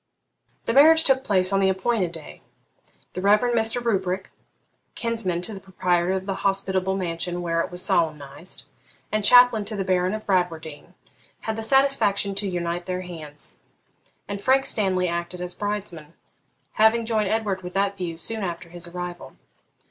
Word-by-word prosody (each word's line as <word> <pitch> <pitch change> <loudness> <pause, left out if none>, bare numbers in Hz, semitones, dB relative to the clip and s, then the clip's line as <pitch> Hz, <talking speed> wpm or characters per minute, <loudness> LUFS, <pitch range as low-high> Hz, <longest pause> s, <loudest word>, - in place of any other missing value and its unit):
The - - 0
marriage 320 +3 +7
took 265 -2 +2
place 190 -4 +1
on 195 - +3
the 190 -1 +3
appointed 190 -1 0
day. 160 -3 -11 0.7
The 185 - -4
Reverend 210 +5 +3
Mr. 225 +1 +2
Rubrick, 190 -5 -1 0.6
kinsman 220 -7 -2
to 215 - -4
the 195 - -7
proprietor 180 -2 0
of 190 0 -3
the 195 -1 -3
hospitable 190 -1 0
mansion 175 -1 -3
where 165 -1 0
it - - -3
was 180 0 -5
solemnised, 155 +1 -1 0.5
and 215 0 0
chaplain 245 -1 +7
to 215 +1 -4
the 195 - -1
Baron 185 +2 +1
of 215 - -7
Bradwardine, 165 -5 -2 0.5
had 220 - -3
the 225 - -4
satisfaction 225 -5 +2
to 195 0 -1
unite 175 0 -3
their 185 0 -2
hands; 155 -5 -7 0.7
and 200 0 -5
Frank 265 +4 +3
Stanley 185 -4 +2
acted 170 +1 -4
as 180 0 -4
bridesman, 190 -7 -5 0.7
having 225 +1 +4
joined 215 -3 0
Edward 210 -4 -1
with 180 0 -9
that 200 0 +1
view 175 -4 -5
soon 220 +5 -2
after 170 -1 -5
his 175 0 -6
arrival. 175 -5 -7
190 Hz, 165 wpm, -24 LUFS, 175-215 Hz, 0.7 s, marriage